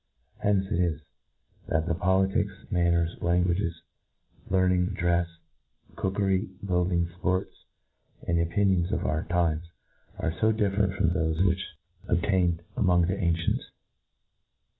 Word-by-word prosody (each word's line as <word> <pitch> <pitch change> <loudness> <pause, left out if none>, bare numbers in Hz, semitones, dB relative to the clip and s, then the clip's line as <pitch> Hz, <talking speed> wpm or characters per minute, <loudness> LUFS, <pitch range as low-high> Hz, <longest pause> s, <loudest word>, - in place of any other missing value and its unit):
Hence 100 -1 +2
it 85 - +1
is, 85 -4 +1 0.7
that 80 0 0
the 85 - 0
politics, 95 +4 +1 0.2
manners, 85 -2 +2
languages, 85 -1 0 0.7
learning, 95 0 +2
drefs, 85 0 +2 0.7
cookery, 95 0 0 0.2
buildings, 90 -2 +1
fports, 95 +1 0 0.7
and 85 0 +2
opinions 95 +1 +1
of 105 - -1
our 75 +5 -1
times, 85 -1 0 0.5
are 80 - -1
fo 110 +6 +2
different, 100 -2 +1
from 90 -3 +2
thofe 80 0 +1
which 90 0 +1 0.5
obtained, 90 -1 +1
among 90 -7 +3
the 95 +3 0
ancients. 85 -3 0
90 Hz, 115 wpm, -27 LUFS, 85-95 Hz, 0.7 s, among